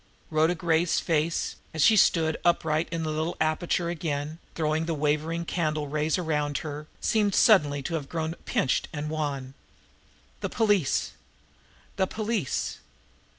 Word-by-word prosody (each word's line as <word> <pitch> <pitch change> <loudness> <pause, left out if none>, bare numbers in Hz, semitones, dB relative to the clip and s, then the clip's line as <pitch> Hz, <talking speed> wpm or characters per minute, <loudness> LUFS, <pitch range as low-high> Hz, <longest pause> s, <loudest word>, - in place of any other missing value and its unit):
Rhoda 160 +3 +3
Gray's 165 0 +2
face, 165 0 0 0.2
as 155 - +2
she 220 - +6
stood 160 -5 +4
upright 160 -2 +2
in 165 -1 -3
the 155 - -1
little 155 +2 -2
aperture 165 +2 0
again, 155 -2 -3 0.2
throwing 160 0 0
the 165 - -1
wavering 155 +3 0
candle 155 -4 -1
rays 150 +3 0
around 150 -4 -1
her, 150 0 -6
seemed 210 -3 +1
suddenly 145 - +4
to 170 - -4
have 150 -4 -3
grown 160 -1 -2
pinched 130 - +1
and 150 0 -4
wan. 140 -4 -3 0.9
The - - -3
police! 205 - +1 0.9
The 190 -1 +2
police! 215 - -2
160 Hz, 140 wpm, -27 LUFS, 150-170 Hz, 0.9 s, she